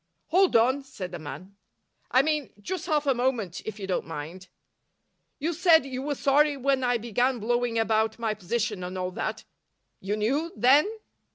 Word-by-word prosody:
"Hold 375 -3 +3
on," 255 +5 +4
said 195 -9 -7
the 175 - -6
man. 155 +7 -9 0.5
"I 260 - +4
mean, 300 -2 -1
just 355 - -5
half 300 -1 +1
a 275 - +3
moment, 240 -8 -1
if 215 -1 -5
you 195 - -4
don't 185 -4 -2
mind. 165 +4 -7 0.9
You 320 +4 -1
said 330 -3 +5
you 260 -1 -5
were 290 +1 -2
sorry 285 +2 +3
when 270 0 +1
I 245 -1 +2
began 245 +3 0
blowing 240 +1 0
about 220 0 +1
my 225 -2 -1
position 210 0 -2
and 180 +1 -5
all 185 0 -2
that. - - -4 0.6
You 200 +2 -2
knew, 280 +10 0
then?" 280 +8 +5
240 Hz, 175 wpm, -27 LUFS, 200-275 Hz, 0.9 s, said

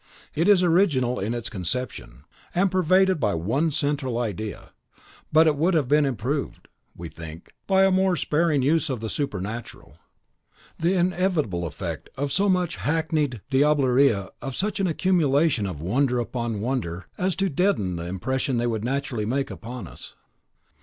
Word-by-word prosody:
It 165 +5 +1
is 200 -3 +6
original 160 -9 +2
in 110 +5 -2
its 120 -1 -4
conception, 95 - -5 0.3
and 185 +1 +2
pervaded 185 0 +3
by 105 -8 +1
one 120 - 0
central 145 -5 -1
idea; 110 -3 -4 0.6
but 160 +1 +6
it 155 -2 +3
would 170 +5 +2
have 150 -5 +2
been 145 +1 +3
improved, 135 +4 -3 0.3
we 85 - -7
think, 80 0 -10
by 190 -1 +4
a 195 - +3
more 190 -1 +3
sparing 155 -4 +1
use 160 +3 +2
of 130 -4 -2
the 110 0 -4
supernatural. 115 -4 -5 0.8
The 170 +3 +2
inevitable 175 - 0
effect - - -6
of 140 +1 -2
so 195 +7 +2
much 180 -2 +1
hackneyed 155 - -1
diablerie 135 -6 +3
of 135 -2 -5
such 210 +1 -1
an 195 - +2
accumulation 160 - +2
of 90 -6 -6
wonder 125 - +1
upon 120 -2 -3
wonder 100 -8 -3
is 185 0 0
to 195 - +1
deaden 165 - 0
the 85 +1 -5
impression 130 +8 -1
they 120 - 0
would 110 -3 -1
naturally 125 -4 -2
make 135 +3 -1
upon 120 -1 -7
us. - - -11
135 Hz, 160 wpm, -24 LUFS, 115-165 Hz, 0.8 s, is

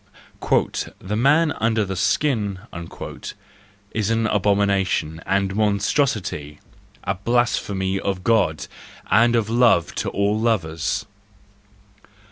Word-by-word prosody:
"The 100 +3 -4
man 150 +7 +3
under 110 -1 +1
the 95 0 -4
skin" 100 - 0 1.3
is 110 -2 -1
an 115 0 +1
abomination 100 -6 +1
and 95 0 0
monstrosity, 100 - 0 0.4
a 95 - 0
blasphemy 100 -3 0
of 95 -2 -3
God 105 -8 +2 0.5
and 120 +2 +5
of 115 -3 +1
love 115 -7 +3
to - - -2
all 100 +2 0
lovers. 85 -9 -1
100 Hz, 95 wpm, -22 LUFS, 95-115 Hz, 1.3 s, and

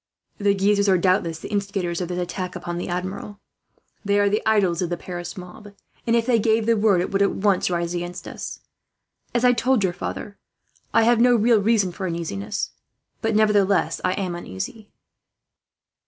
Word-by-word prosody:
The 200 -1 +2
Guises 200 +1 +2
are 190 - +5
doubtless 175 -2 +1
the - - -9
instigators 195 -4 -2
of 180 - -2
this 180 0 -4
attack 180 +1 -4
on 175 0 -2
the - - -4
Admiral. 185 +3 -5 0.6
They 200 0 +2
are 205 0 +3
the 210 +2 +1
idols 195 -6 +2
of 175 - -1
the 175 - -2
Paris 175 +1 -7
mob 200 +3 -11 0.3
and, 230 - +3
if 230 -1 +2
they 240 -2 +3
gave 220 0 +2
the 230 0 +3
word, 205 -4 +3
it 180 - -3
would 200 0 +1
at 200 - +3
once 195 -2 +1
rise 170 -1 -1
against 175 0 -5
us. - - -7 0.7
As 240 +1 +2
I 250 - +7
told 245 -1 +2
your 185 -2 +1
father, 200 +3 -6 0.5
I 230 - +4
have 235 0 +4
no 245 0 +6
real 230 0 +4
reason 205 -3 +2
for 190 +2 -4
uneasiness, 165 - -3 0.5
but 225 -1 0
nevertheless 205 -2 +2
I 185 - +2
am 185 -3 -3
uneasy." 175 - -7
200 Hz, 185 wpm, -23 LUFS, 180-215 Hz, 0.7 s, I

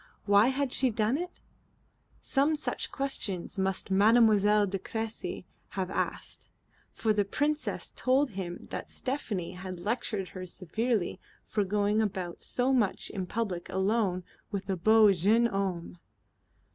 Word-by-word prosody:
Why 205 +2 +6
had 265 0 0
she 260 - +3
done 220 +2 +1
it? 355 +4 -5 0.8
Some 290 +3 +2
such 300 - -3
questions 205 -9 -2
must 190 0 -1
Mademoiselle 210 0 +5
de 195 0 -3
Cressy 225 -2 -4 0.3
have 190 -1 -1
asked, - - -3 0.4
for 220 -1 +1
the 205 -1 +2
Princess 295 +9 -1
told 265 +2 +2
him 185 -3 -6
that - - -5
Stephanie 235 -10 -3
had 185 0 -7
lectured 205 -1 -2
her 185 -1 -7
severely 210 +3 -1 0.2
for 210 - 0
going 205 +2 +1
about 185 -5 -3
so 255 +2 +1
much 220 -7 +1
in 190 -3 -4
public 190 -6 -3
alone 190 -1 +1 0.3
with 200 -2 -4
a - - +1
beau 215 +3 +6
jeune 205 +6 +3
homme. 190 -5 -2
205 Hz, 135 wpm, -29 LUFS, 190-235 Hz, 0.8 s, Why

